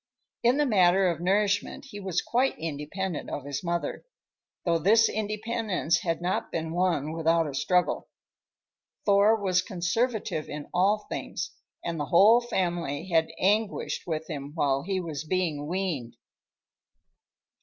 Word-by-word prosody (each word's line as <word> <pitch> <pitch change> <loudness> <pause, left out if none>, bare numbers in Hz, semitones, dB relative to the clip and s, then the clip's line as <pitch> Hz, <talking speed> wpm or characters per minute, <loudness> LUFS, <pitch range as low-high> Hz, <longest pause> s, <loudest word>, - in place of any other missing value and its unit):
In 240 +3 +3
the 295 - +3
matter 190 -5 +4
of 170 - -6
nourishment 200 +2 +1
he 205 - -7
was 190 -3 -1
quite 255 +3 +1
independent 165 +3 -4
of 140 - -5
his 140 +2 -4
mother, 170 0 -2 0.6
though 170 -2 +2
this 220 +7 +5
independence 215 -4 -1
had 165 -1 -2
not 180 - -1
been 160 -1 -3
won 170 -4 0
without 165 0 +2
a 145 - -5
struggle. 180 +6 +1 1.0
Thor 205 +2 +5
was 185 -2 +2
conservative 190 -1 -1
in 150 0 -6
all 200 +4 +2
things, - - -4 0.3
and 170 -2 -2
the 145 - -1
whole 210 - +6
family 175 - -2
had 165 -2 +3
anguished 205 +1 0
with 160 -1 -3
him 145 -3 -6
when 140 -3 +1
he 190 0 -1
was 160 -4 -4
being 160 -4 -1
weaned. 170 -9 -3
180 Hz, 140 wpm, -27 LUFS, 160-205 Hz, 1.0 s, whole